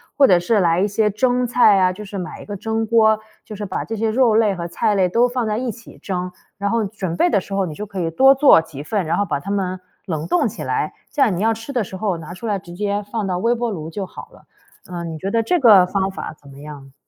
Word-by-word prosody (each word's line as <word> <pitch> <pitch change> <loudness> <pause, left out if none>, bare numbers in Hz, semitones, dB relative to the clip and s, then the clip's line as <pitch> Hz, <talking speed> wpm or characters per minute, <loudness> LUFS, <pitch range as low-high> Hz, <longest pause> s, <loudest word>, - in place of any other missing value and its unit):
或 285 - +6
者 180 -2 +5
是 205 +5 +1
来 170 -1 +2
一 200 - +2
些 210 +1 +1
蒸 245 +4 +1
菜 235 -4 +5
啊， 185 -1 +3
就 210 +3 -9
是 200 0 -7
买 180 -1 -6
一 - - -11
个 205 - -6
蒸 225 +3 -2
锅， 220 -1 +4 0.2
就 215 - -9
是 210 - -4
把 185 - -3
这 225 - -5
些 225 +1 0
肉 230 -1 +3
类 215 -3 +3
和 170 -1 -5
菜 210 +4 0
类 185 -2 +2
都 235 +7 +3
放 245 -1 -2
在 210 0 -1
一 250 +1 -2
起 235 +2 -14
蒸。 180 -2 -3 0.3
然 200 0 -1
后 230 -2 +1
准 190 -4 -5
备 355 - +3
的 200 - +2
时 195 - -9
候 195 -1 +1
你 160 - -6
就 210 +7 -6
可 195 -2 -7
以 165 - -1
多 265 +11 +6
做 275 - +6
几 155 -3 -9
份， 195 +3 -2
然 155 - 0
后 205 - +1
把 165 - -2
它 195 - -5
们 185 -2 -2 0.3
冷 160 -4 -3
冻 350 - +2
起 - - -6
来， - - -2 0.2
这 295 - -2
样 225 -9 +3
你 175 - -3
要 225 +1 +2
吃 225 +5 -8
的 245 -4 +1
时 190 -1 -8
候 195 -2 -1
拿 165 +1 -9
出 205 +6 -7
来 205 -2 0
直 175 -2 -12
接 205 +2 -2
放 220 -4 -2
到 180 -1 -1
微 230 +6 +1
波 240 0 -2
炉 160 -5 -6
就 195 +4 -5
好 - - -11
了。 - - -19 0.4
呃， 175 -1 -5
你 165 -1 -5
觉 190 +5 -4
得 230 0 +1
这 355 +10 +1
个 210 - +7
方 190 0 -1
法 190 - -6
怎 140 - -19
么 135 - -13
样？ 145 -2 -11
200 Hz, 310 characters per minute, -20 LUFS, 180-225 Hz, 0.4 s, 个